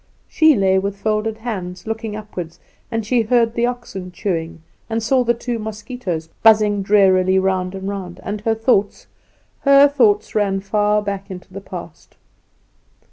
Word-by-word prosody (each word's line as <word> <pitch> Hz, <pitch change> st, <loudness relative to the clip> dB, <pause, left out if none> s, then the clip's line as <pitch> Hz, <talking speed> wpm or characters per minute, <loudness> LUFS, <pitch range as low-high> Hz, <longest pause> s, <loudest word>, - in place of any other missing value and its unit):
She 315 Hz, -2 st, +4 dB
lay 190 Hz, -2 st, +3 dB
with 200 Hz, +1 st, -3 dB
folded 215 Hz, +1 st, -1 dB
hands, 185 Hz, -6 st, -6 dB
looking 225 Hz, -1 st, -4 dB
upward; 185 Hz, -6 st, -7 dB, 0.3 s
and 225 Hz, -2 st, -2 dB
she 240 Hz, +2 st, +2 dB
heard 230 Hz, 0 st, +2 dB
the 235 Hz, 0 st, +1 dB
oxen 215 Hz, -7 st, -6 dB
chewing, 165 Hz, -4 st, -4 dB, 0.3 s
and 225 Hz, 0 st, 0 dB
she 225 Hz, -, -5 dB
saw 255 Hz, +2 st, +3 dB
the 235 Hz, 0 st, +1 dB
two 235 Hz, 0 st, -4 dB
mosquitoes 215 Hz, -6 st, -5 dB
buzzing 210 Hz, -2 st, +5 dB
drearily 190 Hz, -2 st, +4 dB
round 190 Hz, -1 st, 0 dB
and 190 Hz, 0 st, -6 dB
round, 190 Hz, -3 st, -6 dB
and 205 Hz, 0 st, -4 dB
her 225 Hz, +1 st, +1 dB
thoughts 220 Hz, -3 st, +1 dB, 0.5 s
her 280 Hz, 0 st, +6 dB
thoughts 410 Hz, +9 st, +2 dB
ran 200 Hz, -2 st, +1 dB
far 210 Hz, +1 st, +1 dB
back 200 Hz, 0 st, -4 dB
into 185 Hz, 0 st, -10 dB
the 200 Hz, -, -7 dB
past. 175 Hz, -4 st, -10 dB
210 Hz, 160 wpm, -19 LUFS, 190-225 Hz, 0.5 s, her